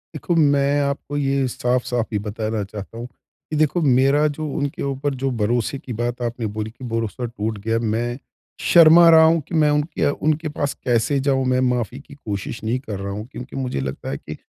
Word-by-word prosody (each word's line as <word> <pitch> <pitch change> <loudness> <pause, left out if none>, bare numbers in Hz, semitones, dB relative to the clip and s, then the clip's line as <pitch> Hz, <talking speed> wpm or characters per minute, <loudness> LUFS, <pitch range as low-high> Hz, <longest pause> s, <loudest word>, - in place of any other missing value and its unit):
देखो, 170 +4 -1 0.2
मैं 140 +1 +2
आपको 140 +1 -2
ये 135 -1 +1
साफ़-साफ़ 125 -1 0
ही - - +2
बताना 110 0 -2
चाहता 100 +2 -9
हूँ, 120 +1 -6 0.4
कि - - -1
देखो 155 +3 +2
मेरा 135 +2 +4
जो 155 0 -4
उनके 145 -2 -2
ऊपर 140 +1 -2
जो 135 - +2
भरोसे 120 +5 0
की 125 - -7
बात 120 +1 -2
आपने 120 -1 -3
बोली 110 0 -2
कि 120 +3 -11
भरोसा 115 +2 -2
टूट 110 -2 -4
गया। 115 0 +1 0.2
मैं 120 +1 -2 0.5
शर्मा 170 0 +8
रहा 160 - +8
हूँ 160 0 +4
कि 170 - -4
मैं 150 - +4
उनके 150 0 0 0.2
उनके 155 +1 +1
पास 145 -1 0
कैसे 125 +3 +1
जाऊँ? 135 -1 +2
मैं 130 0 +2
माफ़ी 125 +1 -2
की 140 0 -15
कोशिश 110 -3 -5
नहीं 115 +4 0
कर 100 -6 -5
रहा 100 0 -4
हूँ, 105 +2 -5
क्योंकि 125 +1 -9
मुझे 125 - -2
लगता 65 0 -5
है 70 - -3
कि - - -9
125 Hz, 205 wpm, -21 LUFS, 115-145 Hz, 0.5 s, शर्मा